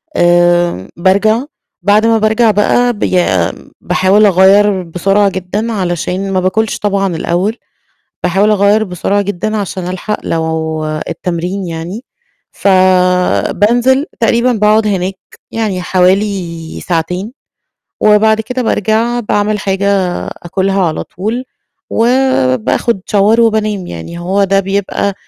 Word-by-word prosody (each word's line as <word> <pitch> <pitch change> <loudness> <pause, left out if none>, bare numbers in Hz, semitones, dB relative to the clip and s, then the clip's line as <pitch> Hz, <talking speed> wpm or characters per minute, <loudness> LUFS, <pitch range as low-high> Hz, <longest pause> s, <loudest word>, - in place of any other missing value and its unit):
آآ 175 - +2
بارجع، 200 +6 +2 0.4
بعد 205 +4 +3
ما 225 0 +3
بارجع 220 +1 +2
بقى 245 +4 +2
بي 185 -4 0 0.6
باحاول 200 +3 +3
أغيّر 195 0 +4
بسرعة 195 +4 +1
جدًا 195 +5 -3
علشان 185 0 -2
ما 185 - +2
بآكلش 210 +4 0
طبعًا 195 -3 -1
الأول، 185 +8 -1 0.7
باحاول 195 +4 +2
أغيّر 210 +1 +3
بسرعة 195 +2 -1
جدًا 205 +2 -3
عشان 185 -3 -4
ألحق 185 +3 -3
لو 160 -1 -2 0.2
التمرين 180 +3 -3
يعني، 170 +8 -6 0.5
فبانزل 185 - +2
تقريبًا 235 +2 +2
باقعد 215 0 +2
هناك 190 -1 -2 0.3
يعني 205 -5 -2
حوالي 180 -3 -1
ساعتين، 180 +6 -3 0.7
وبعد 215 +1 +4
كده 250 +3 -4
بارجع 225 +2 0
باعمِل 210 -1 -1
حاجة 195 -1 0 0.3
أكلها 190 +2 -1
على 160 -3 -1
طول 225 +7 -4 0.5
وبآخد 230 - +1
Shower 210 +3 +3
وبانام. 215 -4 +1
يعني 85 - -8
هو 190 +3 0
ده 195 +1 +2
بيبقى 200 +1 -2
195 Hz, 110 wpm, -13 LUFS, 180-215 Hz, 0.7 s, أغيّر